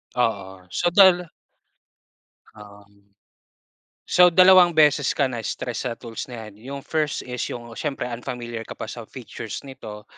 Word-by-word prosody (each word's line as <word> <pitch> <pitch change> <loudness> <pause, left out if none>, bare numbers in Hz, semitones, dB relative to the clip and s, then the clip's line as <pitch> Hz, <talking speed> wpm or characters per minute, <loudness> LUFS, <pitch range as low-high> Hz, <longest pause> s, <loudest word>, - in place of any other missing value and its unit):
Oo, 95 -6 -2
so, 175 - 0
dal 180 -2 +6 1.3
Um. 100 -1 -16 1.0
So, 180 0 +6
dalawang 185 -2 +7
beses 150 -3 +4
ka 140 -3 +1
na-stress 120 +1 -4
sa 115 - -4
tools 115 -2 -7
na 120 -3 -8
'yan. 100 - -20 0.2
Yung 140 - -6
first 155 -2 -1
is 125 -1 -4
yung 120 -1 -7
siyempre, 145 -3 -3
unfamiliar 120 -1 -6
ka - - -8
pa - - -6
sa - - -8
features - - -8
nito, 110 -6 -10
125 Hz, 140 wpm, -23 LUFS, 110-150 Hz, 1.3 s, dalawang